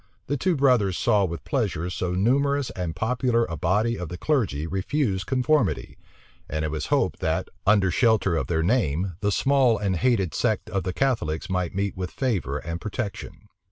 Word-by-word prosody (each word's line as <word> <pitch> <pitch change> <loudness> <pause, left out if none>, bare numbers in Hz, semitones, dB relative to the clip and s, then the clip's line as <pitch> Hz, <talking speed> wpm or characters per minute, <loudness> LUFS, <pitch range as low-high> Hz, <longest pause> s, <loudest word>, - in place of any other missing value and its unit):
The 145 - -1
two 175 +6 +1
brothers 125 - +3
saw 100 -2 +3
with 85 -6 -5
pleasure 85 +3 -1
so 90 0 -2
numerous 140 +7 +1
and 90 -3 -4
popular 120 0 +1
a 85 - -5
body 105 +9 +1
of 90 -3 -5
the 90 - -6
clergy 105 - 0
refuse 95 - -1
conformity; 130 -2 0 0.5
and 80 0 -2
it 75 - -2
was 75 -1 -3
hoped - - +1
that, - - -1 0.2
under 100 -3 +4
shelter 110 -6 +3
of 80 - -1
their 80 -2 0
name, 90 - +1
the 105 -1 0
small 135 0 +3
and 100 -2 -1
hated 95 - +1
sect - - -1
of 95 - 0
the 90 - -1
Catholics 95 -10 -1
might 90 -2 -1
meet 100 0 -1
with 90 -1 -4
favor 100 - -1
and 85 +3 -5
protection. 110 -1 -5
100 Hz, 180 wpm, -25 LUFS, 90-125 Hz, 0.5 s, under